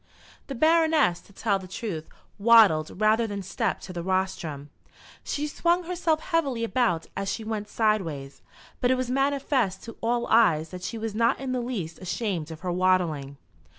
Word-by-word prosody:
The 275 - -5
Baroness, 315 - +3
to - - -21
tell 200 0 0
the 185 - -10
truth, 180 -4 -5 0.3
waddled 200 -8 +5
rather 220 +2 +3
than 200 -2 -5
stepped 200 +2 -2
to 185 - -8
the 175 - -4
rostrum. 170 -6 -2 0.5
She 295 - -2
swung 345 +4 +1
herself 335 -3 0
heavily 290 -10 0
about 230 -9 +1
as 195 -1 -2
she 225 - -4
went 215 -1 -4
sideways; 170 -13 -1 0.4
but 245 - +2
it 260 - +4
was 255 -1 -2
manifest 270 -7 0
to 230 - -9
all 235 +1 0
eyes 165 -9 +3
that 180 +1 -8
she 225 +5 -4
was 220 -1 -4
not 230 +2 +2
in 265 -1 -4
the 255 -1 -1
least 200 -10 -4
ashamed 185 -3 -3
of 160 -1 -9
her 180 -1 -2
waddling. 175 -6 +1
215 Hz, 175 wpm, -26 LUFS, 180-250 Hz, 0.5 s, waddled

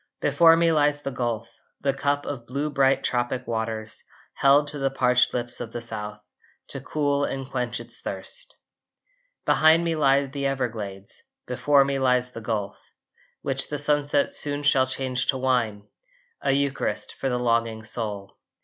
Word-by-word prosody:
Before 165 -1 +5
me 165 0 +3
lies 145 -1 +2
the 140 - -3
Gulf, 120 -3 -4 0.2
The 140 -1 +1
cup 145 +1 -1
of 120 -5 -6
blue 140 +4 -2
bright 135 -1 +3
tropic 125 +1 -1
waters, 110 -1 -4 0.3
Held 140 +2 +4
to 145 0 -2
the 135 0 +1
parched 125 -2 +3
lips 120 -1 -2
of 115 - -6
the 120 - -3
South 105 -2 -4 0.5
To - - -5
cool 145 -2 0
and 135 -2 -3
quench 125 -3 -2
its - - -9
thirst. - - -4 0.9
Behind 160 +2 +5
me 165 -1 0
lie 140 -2 +3
the 140 0 -3
Everglades, 110 -7 -4 0.2
Before 135 +3 +3
me 140 0 -1
lies 125 -1 +2
the 115 - -8
Gulf, 105 -3 -4 0.5
Which 135 0 -2
the 150 - -2
sunset 145 0 +1
soon 145 0 0
shall 130 -2 +4
change 130 -1 -2
to 135 - +2
wine, 120 -6 0 0.5
A - - +1
Eucharist 140 0 -1
for 135 - -3
the 125 - 0
longing 115 -2 0
soul. 105 -3 -5
130 Hz, 160 wpm, -25 LUFS, 115-140 Hz, 0.9 s, Before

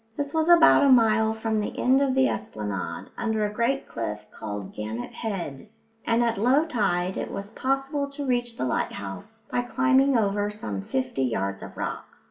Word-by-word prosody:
This 285 0 -3
was 320 +1 +1
about 340 -4 +7
a 280 - +5
mile 220 -3 +5
from 220 0 -1
the 210 - -4
end 260 +2 +3
of 270 -2 +1
the 265 0 +4
esplanade, 105 -3 -4
under 220 -2 0
a 205 - -3
great 250 +5 0
cliff 105 -2 -5
called 105 -3 -6
Gannet 110 +3 -5
Head, 195 - -5 0.4
and 235 +1 +3
at 230 -3 0
low 260 +8 +4
tide 190 - 0
it - - -3
was 200 +1 -6
possible 275 +2 -1
to 280 0 -6
reach 240 -2 -1
the - - -1
lighthouse 165 - -4
by 245 - +1
climbing 265 +1 +3
over 205 -1 +1
some 105 - -5
fifty 130 +6 -2
yards 100 -6 -1
of - - -10
rocks. - - -5
220 Hz, 180 wpm, -26 LUFS, -, 0.4 s, about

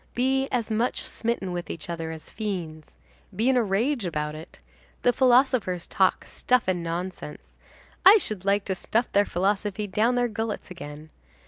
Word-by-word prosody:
Be 265 +2 +1
as 235 -3 -1
much 230 +3 0
smitten 225 -5 -3
with 175 -1 -5
each 160 - -5
other 165 -1 -4
as 160 -1 -8
fiends. 175 -8 -5 0.4
Be 225 +6 +2
in 265 - +3
a 250 - +4
rage 225 +5 0
about 150 -4 -2
it. 155 +1 -11 0.5
The 245 - +4
philosophers 245 -8 +3
talk 190 -1 +1
stuff 250 -1 +1
and 185 -2 0
nonsense. 170 -2 -6 0.5
I 400 +4 +9
should 215 - -3
like 200 +1 +1
to 190 - 0
stuff 225 +6 -1
their 205 0 +3
philosophy 200 +3 -1
down 215 +5 +1
their 245 0 +2
gullets 220 -3 -4
again. 155 -2 -9
200 Hz, 165 wpm, -26 LUFS, 175-240 Hz, 0.5 s, I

